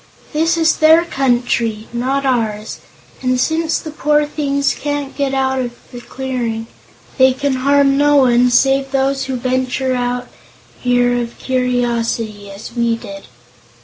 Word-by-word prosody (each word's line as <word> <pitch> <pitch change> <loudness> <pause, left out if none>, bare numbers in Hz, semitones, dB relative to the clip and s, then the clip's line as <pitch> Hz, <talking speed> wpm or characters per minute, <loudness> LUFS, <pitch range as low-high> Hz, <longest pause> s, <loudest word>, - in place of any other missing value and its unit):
This 325 +2 +1
is 325 -1 +2
their 320 +2 +5
country, 240 -6 0
not 265 +3 -1
ours, 220 -5 -1 0.4
and 255 -1 0
since 320 +3 0
the 315 - -7
poor 300 0 +1
things 280 -1 -1
can't 290 -1 -4
get 280 -2 -1
out 265 -1 0
of 245 -2 -3 0.2
the 245 - -9
clearing, 240 -4 -4 0.5
they 260 0 +6
can 265 0 -1
harm 275 +1 +3
no 290 0 +4
one 250 -2 +4
save 270 +2 +3
those 270 0 0
who 260 0 -3
venture 250 0 -1 0.5
here 245 0 +2
out 245 - 0
of 235 0 -7
curiosity, 235 -5 -1
as 200 +4 -10
we 235 -1 +1
did." 200 -4 -10
260 Hz, 145 wpm, -17 LUFS, 240-275 Hz, 0.5 s, they